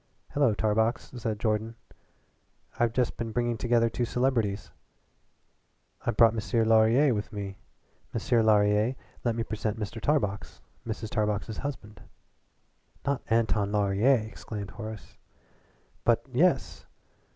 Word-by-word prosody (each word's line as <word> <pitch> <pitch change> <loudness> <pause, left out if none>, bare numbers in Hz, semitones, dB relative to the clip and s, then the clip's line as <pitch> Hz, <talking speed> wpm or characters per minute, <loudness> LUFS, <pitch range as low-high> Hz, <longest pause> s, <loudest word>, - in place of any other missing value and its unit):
"Hello 140 -7 +2
Tarbox," 110 +3 0
said 110 -3 -3
Jordan. 110 +1 -1 1.0
"I've 120 -1 +3
just 125 0 0
been 115 -1 -3
bringing 120 +1 0
together 115 +1 +2
two 115 +2 -2
celebrities. 115 -5 0 1.3
I've 120 -3 -2
brought 115 -2 +6
M'sieur 115 +1 0
Laurier 115 +6 +5
out - - +1
with 105 - -5
me. 100 -1 -6 0.5
M'sieur 120 -2 +1
Laurier, 105 +2 +3 0.3
let 120 -2 +1
me 115 - -1
present 110 0 -3
Mr. 110 +1 -5
Tarbox, 105 -10 -1 0.3
Mrs. 110 -1 -4
Tarbox's 105 0 -1
husband." 110 -7 -6 1.0
"Not 140 -2 0
Anton 110 -3 +2
Laurier!" 105 +4 +3
exclaimed 105 -2 -7
Horace. 110 -5 -9 0.9
"But, - - +2
yes. - - +1
110 Hz, 120 wpm, -28 LUFS, 105-120 Hz, 1.3 s, brought